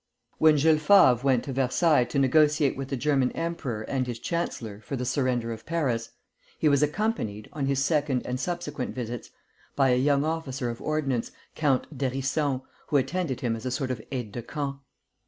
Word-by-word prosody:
When 155 -1 +6
Jules 155 +1 +4
Favre 155 - +6
went 130 -3 +2
to 135 - -5
Versailles 135 +2 +3
to 140 - -4
negotiate 145 +1 +3
with 135 0 -5
the 135 - -3
German 135 -1 +2
emperor 155 -10 -3
and 130 +2 -2
his 120 -2 -4
chancellor 115 - -3
for 135 - -5
the 125 -1 -3
surrender 125 -2 0
of 110 - -10
Paris, 130 -9 -1 0.5
he - - +2
was 140 -1 +4
accompanied, 150 - -1
on 140 -3 -2
his 135 0 +1
second 145 -4 +1
and 125 +1 -3
subsequent 160 -4 -3
visits, 120 -2 -5 0.5
by 135 -2 +3
a 125 - +4
young 140 +2 +2
officer 135 -6 -2
of 115 - -9
ordnance, 140 -6 -1 0.2
Count 145 0 0
d'Hérisson, 135 +1 -1 0.2
who 145 - +3
attended 140 0 -1
him 115 -2 0
as 115 - -8
a - - 0
sort 130 0 -2
of 120 -3 -4
aide 125 -6 -4
de 120 - -5
camp. 140 +3 -4
135 Hz, 185 wpm, -27 LUFS, 125-150 Hz, 0.5 s, When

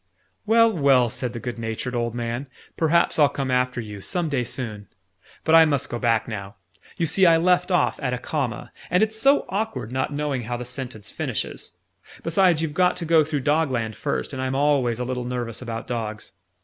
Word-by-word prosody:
"Well, 230 0 +5
well!" 135 -6 +4
said 125 -2 -3
the 120 - -5
good 120 0 -5
natured 115 +3 -4
old 120 -1 -1
man. 120 +3 -3 0.3
"Perhaps 165 +1 +2
I'll 145 -2 +6
come 135 -2 -3
after 125 -1 +1
you, 105 -3 -7
some 175 - -1
day 135 -4 0
soon. 110 -5 -5 0.6
But 160 - +1
I 165 0 +9
must 140 -4 0
go 120 - -3
back 115 -2 +1
now. 100 -3 -6 0.4
You 170 - +1
see 185 +3 +4
I 165 -1 +6
left 180 +2 +2
off 180 - +1
at 130 -3 -1
a 125 - -1
comma, 130 -2 -3 0.2
and 180 +4 +3
it's 220 0 0
so 275 +6 +4
awkward 200 - -3
not 130 +2 -1
knowing 145 -3 -2
how 120 +1 -3
the 125 - -6
sentence 125 -4 -6
finishes! - - -4 0.5
Besides, 165 -1 +3
you've 155 -2 -2
got 180 +2 +2
to 170 - -4
go 160 -1 +5
through 150 -2 -2
Dogland 130 -6 0
first, 65 -9 -3
and 130 - -4
I'm 130 0 -1
always 135 -5 +2
a 125 - -2
little 125 0 -3
nervous 120 -2 -4
about 115 -2 -5
dogs. 110 -3 -5
130 Hz, 200 wpm, -24 LUFS, 120-160 Hz, 0.6 s, I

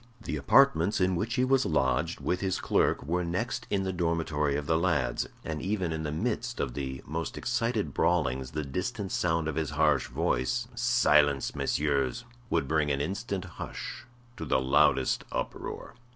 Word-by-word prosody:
The 110 - -4
apartments 95 - +4
in 90 0 +2
which 115 +7 -1
he 130 -1 +2
was 135 0 +3
lodged, 75 +1 0
with 90 - 0
his 95 -1 -1
clerk, - - +1
were 90 +5 -1
next 115 +7 -2
in 100 -1 0
the 95 0 -2
dormitory 80 -4 0
of 75 0 -2
the 80 - +2
lads, 75 -9 0 0.2
and 75 -2 -3
even 95 -4 -1
in 80 - -3
the 75 -2 -3
midst 120 +7 -2
of 65 -4 -1
the 65 -1 -5
most 80 +2 -4
excited 115 - -1
brawlings 65 +1 +1
the 75 +2 -4
distant 95 - -3
sound 80 -2 +1
of 80 - -1
his 80 -2 -1
harsh 75 -3 +2
voice, 115 - 0
"Silence, 75 - +3
messieurs!" 75 - 0 0.2
would 70 - +1
bring 75 0 +1
an 70 -1 0
instant 95 +5 -3
hush 120 - -7 0.3
to - - -5
the - - +2
loudest 70 +3 +3
uproar. - - -5
80 Hz, 170 wpm, -29 LUFS, 75-100 Hz, 0.3 s, apartments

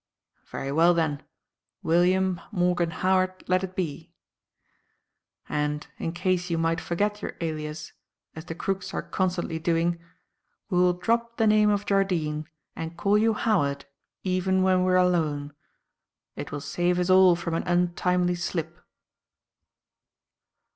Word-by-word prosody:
"Very 135 - -5
well, 165 +4 +4
then 155 -4 0 0.6
William 180 +2 +2
Morgan 180 -3 +1
Howard 185 +2 0
let 185 +1 +2
it 185 -1 -6
be. 170 -7 -4 1.4
And, 150 0 -2
in 165 - -2
case 180 +1 -1
you 170 - 0
might 165 +1 0
forget 205 +4 -1
your - - -5
alias, 155 -1 -5 0.4
as 160 +1 -8
the 165 - -6
crooks 195 +2 -3
are - - -2
constantly 180 -3 -2
doing, 170 +1 0 0.7
we 180 - +2
will 180 0 +4
drop 235 +6 -1
the 225 - +3
name 215 0 +4
of 205 0 0
Jardine 170 -7 0 0.3
and 165 +1 -6
call 200 +4 +2
you 220 +1 +3
Howard 145 -12 0 0.4
even 185 0 +1
when 185 -1 +3
we 185 - +2
are - - +5
alone. 155 -5 +1 0.8
It - - -6
will 145 - -4
save 175 +5 0
us 180 +1 +1
all 185 -1 +7
from 170 -1 -4
an 165 - -2
untimely 180 0 +1
slip." 175 -1 -4
180 Hz, 140 wpm, -26 LUFS, 165-185 Hz, 1.4 s, all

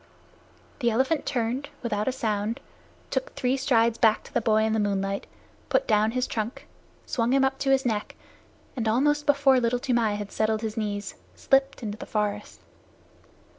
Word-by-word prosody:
The 240 -3 +2
elephant 265 +6 0
turned, 250 +3 -1
without 210 -3 -1
a - - +3
sound, 220 -1 -2 0.5
took - - -2
three 255 +1 +1
strides 235 -4 +2
back 220 -2 +4
to - - -15
the - - +1
boy 220 0 +3
in 220 0 +1
the 220 - +1
moonlight, 200 -1 -1 0.4
put - - +1
down 215 -1 +3
his 250 +2 -1
trunk, 220 +2 -4 0.4
swung 235 +1 0
him 270 0 +4
up 270 0 -1
to 275 - -1
his 270 -1 +3
neck, 215 -3 -2 0.6
and 230 -4 -2
almost 295 +6 +2
before 280 -2 +5
Little 240 0 +1
Toomai 240 -5 +1
had 205 -1 -6
settled 220 0 0
his 220 -1 -3
knees, 205 -2 -3 0.2
slipped 270 -1 +1
into 210 -1 -5
the - - -8
forest. 210 -1 -3
230 Hz, 170 wpm, -26 LUFS, 215-265 Hz, 0.6 s, before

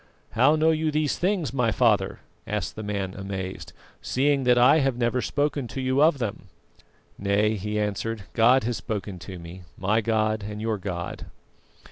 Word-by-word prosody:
"How 130 +7 +4
know 160 +1 +3
you 160 0 0
these 150 -1 0
things, 180 -6 0
my 125 -4 +1
father," 105 -5 +2 0.3
asked 105 -3 -3
the 110 - -6
man 100 -3 -3
amazed, 95 -1 -6 0.3
"seeing 135 0 +1
that 125 -1 +5
I 125 +6 +6
have 135 -4 +1
never 120 +1 +1
spoken 145 -2 -1
to 135 - -6
you 130 +1 +1
of 155 -1 +5
them?" 110 -5 -4 0.7
"Nay," 100 +2 +2
he 105 +1 -3
answered, 105 +1 -2
"God 125 +3 +5
has 120 +1 -1
spoken 100 -4 -5
to 95 +1 -8
me. 85 +2 -10 0.2
My 105 +4 +1
God 110 -1 0
and 105 +1 -6
your 110 -1 -1
God." 90 -3 -5
110 Hz, 170 wpm, -25 LUFS, 100-135 Hz, 0.7 s, I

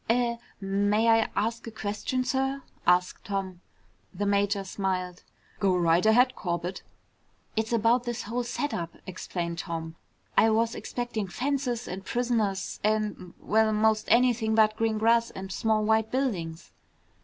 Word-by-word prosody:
"Er 235 0 +2 0.2
may 205 +3 +1
I 225 -1 +4
ask 230 +2 -1
a - - -5
question, 220 +4 -2
sir?" 270 +1 -1 0.2
asked 180 0 +2
Tom. 190 -3 -3 0.5
The 205 - -3
major 200 0 +1
smiled. 185 -2 -3 0.4
"Go 190 -2 +3
right 170 0 +3
ahead, 245 +4 +4
Corbett." 175 0 -3 0.7
"It's 220 +1 -1
about 235 +2 +3
this 240 0 -3
whole 240 +4 -2
setup," 235 - -3
explained 170 -2 -4
Tom. 165 -2 -5 0.4
"I 225 - +5
was 225 +1 +2
expecting 240 -4 -4
fences 250 +3 -2
and 190 +2 -6
prisoners 225 -4 -1
and 210 -4 -1
well, 220 +1 +2
most 215 0 +2
anything 235 -2 +3
but 215 -1 +4
green 225 -1 0
grass 230 +1 +3
and 190 0 -8
small 215 +1 +1
white 220 0 +2
buildings!" 185 -12 -2
215 Hz, 140 wpm, -27 LUFS, 190-235 Hz, 0.7 s, I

